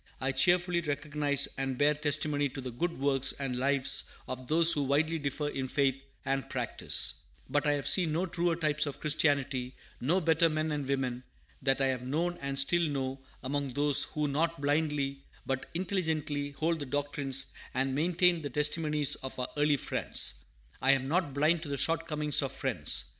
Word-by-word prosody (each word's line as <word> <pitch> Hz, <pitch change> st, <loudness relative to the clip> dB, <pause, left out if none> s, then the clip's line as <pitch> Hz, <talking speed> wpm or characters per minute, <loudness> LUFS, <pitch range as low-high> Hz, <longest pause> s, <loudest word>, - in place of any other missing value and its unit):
I 135 Hz, +1 st, 0 dB
cheerfully 175 Hz, +6 st, +2 dB
recognize 145 Hz, -2 st, 0 dB
and 135 Hz, -1 st, -2 dB
bear 145 Hz, +2 st, +4 dB
testimony 145 Hz, -1 st, 0 dB
to 135 Hz, -, -8 dB
the 130 Hz, -1 st, -6 dB
good 170 Hz, +8 st, -3 dB
works 135 Hz, -1 st, +2 dB
and 135 Hz, -3 st, -4 dB
lives 135 Hz, +1 st, +4 dB, 0.2 s
of 130 Hz, 0 st, -6 dB
those 165 Hz, +3 st, +6 dB
who 145 Hz, -, 0 dB
widely 155 Hz, +4 st, +1 dB
differ 145 Hz, +1 st, -3 dB
in 135 Hz, -2 st, -3 dB
faith 135 Hz, 0 st, +1 dB, 0.3 s
and 135 Hz, 0 st, -1 dB
practice; -, -, -1 dB, 0.3 s
but 145 Hz, 0 st, 0 dB
I 145 Hz, -, +4 dB
have 145 Hz, -1 st, -2 dB
seen 175 Hz, -5 st, +4 dB
no 170 Hz, +4 st, 0 dB
truer 175 Hz, -2 st, 0 dB
types 150 Hz, -2 st, 0 dB
of 140 Hz, -, -6 dB
Christianity, 140 Hz, -4 st, 0 dB, 0.2 s
no 160 Hz, +10 st, +1 dB
better 165 Hz, -1 st, +3 dB
men 155 Hz, 0 st, -1 dB
and 145 Hz, -2 st, -3 dB
women, 130 Hz, -2 st, -2 dB, 0.4 s
than 135 Hz, 0 st, +2 dB
I 135 Hz, -, +3 dB
have 130 Hz, -2 st, -1 dB
known 165 Hz, +7 st, -2 dB
and 140 Hz, 0 st, -3 dB
still 170 Hz, +6 st, +3 dB
know 135 Hz, -4 st, -2 dB, 0.2 s
among 140 Hz, -1 st, -3 dB
those 145 Hz, -1 st, +3 dB
who 150 Hz, -1 st, -2 dB
not 165 Hz, +3 st, -1 dB
blindly, 145 Hz, -1 st, -1 dB, 0.2 s
but 135 Hz, -1 st, -3 dB
intelligently, 160 Hz, -6 st, -2 dB
hold 160 Hz, +3 st, -1 dB
the 145 Hz, -, -5 dB
doctrines 140 Hz, -1 st, -1 dB, 0.2 s
and 130 Hz, +1 st, 0 dB
maintain 170 Hz, +3 st, +2 dB
the 145 Hz, -, -4 dB
testimonies 150 Hz, +1 st, +2 dB
of 130 Hz, -, -8 dB
our 125 Hz, -, -3 dB
early 145 Hz, 0 st, +2 dB
Friends. -, -, -1 dB, 0.4 s
I 135 Hz, -, +5 dB
am 135 Hz, -1 st, -1 dB
not 150 Hz, -3 st, 0 dB
blind 155 Hz, +3 st, +2 dB
to 155 Hz, -, -7 dB
the 140 Hz, -, -2 dB
shortcomings 155 Hz, -2 st, +1 dB
of 135 Hz, -2 st, -3 dB
Friends. 135 Hz, -, +1 dB
145 Hz, 180 wpm, -30 LUFS, 135-155 Hz, 0.4 s, those